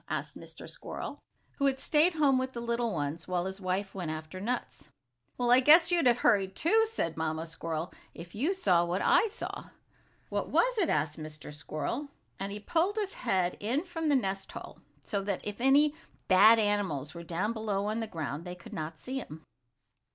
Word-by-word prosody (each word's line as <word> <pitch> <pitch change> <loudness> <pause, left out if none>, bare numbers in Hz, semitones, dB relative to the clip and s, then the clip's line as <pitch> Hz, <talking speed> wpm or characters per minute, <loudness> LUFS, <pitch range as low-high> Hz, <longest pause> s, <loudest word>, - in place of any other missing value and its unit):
asked - - -3
Mr. - - -9
Squirrel, - - -7 0.4
who 280 - +2
had 265 -1 0
stayed 315 +6 +3
home 280 -4 +4
with 260 0 -3
the 235 - -5
little 235 0 -1
ones, 155 -1 -3
while 180 -1 -1
his 190 +1 -5
wife 190 +2 -2
went 180 -4 -4
after 155 +3 -6
nuts. 240 -7 -4 0.5
"Well, 245 -1 +1
I 250 - +8
guess 325 +6 +7
you'd 340 -6 +3
have 240 -1 +5
hurried 195 -6 +2
too," 445 - +3
said 170 - -2
the - - -9
mamma 160 0 -2
squirrel, 165 0 -4 0.2
"if 170 +1 -10
you 275 - 0
saw 180 - +3
what 175 +2 -1
I - - +5
saw!" 430 - -6 0.6
"What - - -2
was - - +3
it?" 350 - +2
asked 150 +1 0
Mr. 155 -1 -8
Squirrel, 155 - -4 0.3
and 195 +1 -3
he 205 - -5
pulled 335 - +1
his 415 -2 -2
head 185 -6 0
in 245 +9 0
from 325 -3 -3
the 290 - +4
nest 195 -6 -1
hole, - - -9 0.2
so 200 +5 -2
that 195 -1 -2
if 210 +2 -5
any 285 +3 +5 0.3
bad 210 +5 +7
animals 195 -9 0
were 170 - -8
down 175 +6 -2
below 210 -3 -2
on 215 +2 -1
the 225 - -3
ground 160 -4 -4
they 180 0 -6
could 175 - -13
not 155 0 -5
see 265 +1 -4
him. 155 - -9
205 Hz, 200 wpm, -30 LUFS, 170-265 Hz, 0.6 s, I